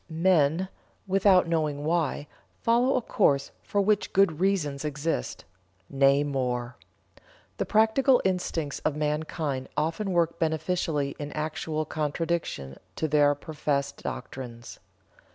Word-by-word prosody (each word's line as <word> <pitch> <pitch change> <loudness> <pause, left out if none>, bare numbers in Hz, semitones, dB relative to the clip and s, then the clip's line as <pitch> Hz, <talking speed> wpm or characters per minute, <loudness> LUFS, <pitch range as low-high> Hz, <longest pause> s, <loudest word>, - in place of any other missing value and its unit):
Men, 165 0 +2 0.4
without 190 -2 +4
knowing 155 -3 -1
why, 160 -3 0 0.4
follow 240 +3 +3
a 250 - 0
course 140 -12 +2
for 205 - 0
which 210 +1 +1
good 190 -5 +3
reasons 170 -8 0
exist. 150 - -3 0.5
Nay, 140 +1 +4
more. 125 -4 -2 0.8
The - - -2
practical 235 +5 +4
instincts 175 -5 -1
of 155 - -1
mankind 150 -2 -2
often 165 +6 -1
work 170 -1 +1
beneficially 160 -3 -1
in 145 0 -5
actual 155 0 -2
contradiction 155 - -3 0.2
to 160 - -1
their 145 -1 +4
professed 145 -2 -3
doctrines." 120 -3 -7
155 Hz, 115 wpm, -27 LUFS, 145-180 Hz, 0.8 s, without